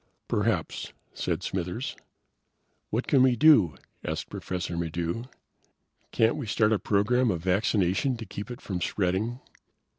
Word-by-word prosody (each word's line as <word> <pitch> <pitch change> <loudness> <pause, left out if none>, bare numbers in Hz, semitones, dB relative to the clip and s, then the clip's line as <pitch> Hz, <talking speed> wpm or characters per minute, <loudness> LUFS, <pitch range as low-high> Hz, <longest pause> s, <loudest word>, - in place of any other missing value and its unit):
"Perhaps," - - -1 0.2
said - - -2
Smithers. 95 +7 -3 0.9
"What 115 +4 -1
can 135 - +4
we 130 -1 +5
do?" 110 - +6 0.3
asked - - -4
Professor 90 -1 -4
Maddox. 85 +7 -2 0.8
"Can't 115 +4 +3
we 140 -6 -4
start 110 +1 +3
a 105 - +1
program 115 +5 +2
of 85 -5 -1
vaccination 100 +6 +1
to 115 - -7
keep 100 +2 -7
it 120 - -7
from 90 -3 -4
spreading?" 105 +8 -1
105 Hz, 130 wpm, -27 LUFS, 90-120 Hz, 0.9 s, do